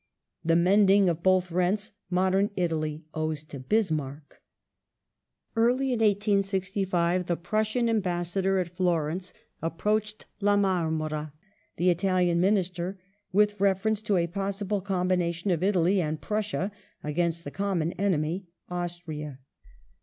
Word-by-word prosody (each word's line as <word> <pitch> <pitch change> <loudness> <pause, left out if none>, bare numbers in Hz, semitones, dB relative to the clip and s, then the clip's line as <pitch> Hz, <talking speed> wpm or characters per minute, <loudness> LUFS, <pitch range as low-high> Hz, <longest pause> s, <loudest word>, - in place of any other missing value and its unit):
The 165 0 +3
mending 195 +2 +5
of 170 -1 -2
both 185 -1 +3
rents 190 +5 0 0.2
modern 190 +2 +2
Italy 155 -3 -2
owes 155 -1 -2
to 145 -2 -9
Bismarck. 150 - -2 1.1
Early 250 +3 +2
in 235 - -1
1865 195 -4 +1
the 170 - 0
Prussian 215 +6 0
Ambassador 190 -2 0
at 175 -1 -2
Florence 175 0 0 0.3
approached 210 +6 -1
La 205 0 +3
Marmora, 160 -6 0 0.4
the 180 +1 +4
Italian 180 -1 +2
Minister, 185 -1 0 0.3
with 205 +1 +2
reference 200 +2 +2
to 210 -3 +1
a 170 - +2
possible 195 +2 -2
combination 180 -1 0
of 170 -2 0
Italy 185 0 +3
and 155 -1 -2
Prussia 210 -2 -2 0.3
against 170 +2 -1
the 145 - -6
common 185 -4 -1
enemy, 180 -1 -1 0.2
Austria. 170 -5 -5
185 Hz, 115 wpm, -27 LUFS, 170-200 Hz, 1.1 s, mending